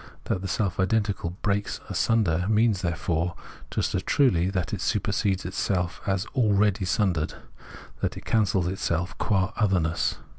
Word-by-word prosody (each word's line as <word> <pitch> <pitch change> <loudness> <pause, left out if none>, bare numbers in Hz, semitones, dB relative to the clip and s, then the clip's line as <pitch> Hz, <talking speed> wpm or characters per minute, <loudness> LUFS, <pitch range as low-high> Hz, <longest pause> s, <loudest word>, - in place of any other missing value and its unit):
That 90 - -2
the 95 - -3
self 95 -1 -1
identical 95 -3 0
breaks 100 0 0
asunder 90 -6 +1
means, 110 -2 +3
therefore, 85 0 -1 0.3
juSt - - -1
as - - 0
truly 95 -11 +3
that 95 -3 -2
it - - -2
supersedes 95 -2 0
itself 90 -1 -1
as 95 0 0
already 105 -5 +2
sundered, 90 -4 0 0.7
that - - -1
it - - -10
cancels 100 -5 +2
itself 90 -2 -1
qua 95 -2 +1
otherness. 90 -7 +1
95 Hz, 140 wpm, -26 LUFS, 90-105 Hz, 0.7 s, means